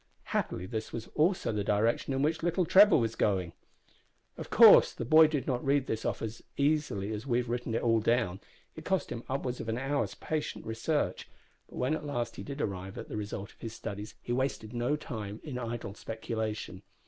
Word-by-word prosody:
Happily 90 - -1
this 110 +3 -4
was 115 -1 -5
also 180 -1 +2
the 105 -2 -1
direction 110 +6 +1
in 135 +1 0
which 160 +2 +1
little 175 +2 +1
Trevor 200 +4 +7
was 115 -4 0
going. 95 -6 0 0.8
Of - - -8
course - - +8
the 120 - -5
boy 155 +5 +7
did 145 -4 -2
not 125 -2 -1
read 140 -1 +2
this 110 -3 -3
off - - -2
as 115 +1 -5 0.2
readily 140 -9 0
as 110 +5 -6
we 120 -2 +2
have 125 -1 -1
written 120 -1 -2
it - - -1
all 115 -1 +4
down. 110 -4 +1 0.4
It 160 - -9
cost 190 +1 -1
him 115 - -5
upwards 130 -2 -2
of 115 - -5
an 110 - -1
hour's 135 +2 -1
patient 155 -1 -4
research; 115 +7 -1 0.4
but - - -13
when 130 +4 +1
at 155 -1 -3
last 120 -6 -3
he - - -5
did 140 +1 -5
arrive 95 -3 -4
at - - -7
the - - -5
result 100 -2 -5
of - - -32
his 115 -1 -5
studies 105 -1 -6
he 120 - -2
wasted 120 -3 -2
no 120 +5 0
time 110 -8 -6
in 135 -5 -5
idle 115 -4 -4
speculation. 110 0 -4
120 Hz, 205 wpm, -30 LUFS, 110-145 Hz, 0.8 s, course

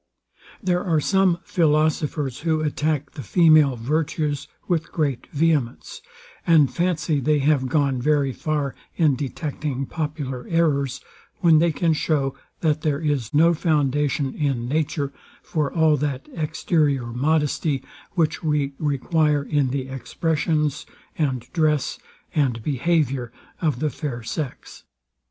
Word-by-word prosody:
There 180 -1 +1
are 165 -5 +2
some 190 +1 +3
philosophers, 150 -4 +1
who 160 -1 0
attack 150 -1 -1
the - - -8
female 155 - +5
virtues 145 +3 -1 0.2
with 170 -4 -1
great 145 -6 -1
vehemence, 145 - -1 0.5
and 155 -5 +5
fancy 170 -4 0
they 150 +3 +2
have 140 -2 +2
gone 140 -3 +1
very 145 -1 +2
far 150 -2 -2 0.2
in 155 -5 +3
detecting 140 0 -3
popular 145 -5 -4
errors, 145 -6 +1 0.4
when 165 -4 +6
they 170 +1 +3
can 165 +1 +1
show, 145 -3 0 0.3
that 155 -2 +1
there 150 -3 0
is 145 -7 -1
no 165 +3 +5
foundation 145 -3 +1
in 135 -6 -1
nature 145 0 -1 0.3
for 150 -3 -1
all 160 -2 +4
that 140 -2 -3
exterior 150 -4 0
modesty, 145 0 0 0.3
which 160 -4 0
we 150 -3 0
require 150 0 +1
in 140 -2 +1
the 130 0 -3
expressions, 150 +3 -1 0.3
and 135 -6 0
dress, 155 -4 +1 0.3
and 125 -7 0
behaviour 135 -3 0 0.3
of 150 -7 0
the 150 0 0
fair 125 -4 -5
sex. 130 +4 -6
150 Hz, 125 wpm, -23 LUFS, 135-160 Hz, 0.5 s, when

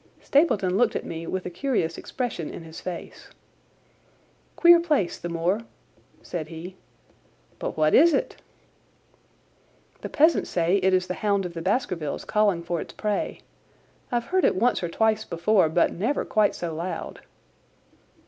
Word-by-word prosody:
Stapleton 205 - +2
looked 245 - +2
at - - -3
me 165 0 -6
with 190 -1 -3
a 180 - -4
curious 175 -5 -1
expression 235 - -4
in 170 - -8
his 160 0 -10
face. 175 -2 -8 1.3
"Queer 345 0 +7
place, 300 - 0
the 175 - -5
moor!" 170 +6 0 0.6
said 160 -3 -5
he. 170 +3 -9 0.8
"But - - -4
what 155 0 +3
is 335 +4 +7
it?" 285 - -1 1.6
"The - - -5
peasants 315 +3 +3
say 175 +2 +2
it 190 -1 +3
is 185 0 +1
the 180 - -3
Hound 200 -3 +1
of 175 - -6
the 165 - -5
Baskervilles 180 - -2
calling 205 -5 +1
for 170 -1 -2
its - - -9
prey. 210 -2 -2 0.7
I've 240 -1 0
heard 375 0 +1
it - - +3
once 240 +6 +2
or 175 - -2
twice 220 +4 +1
before, 175 0 +2
but 170 +2 +2
never 230 +11 -1
quite 210 -2 +2
so 170 -2 -4
loud." 170 +4 -5
185 Hz, 155 wpm, -25 LUFS, 170-220 Hz, 1.6 s, Queer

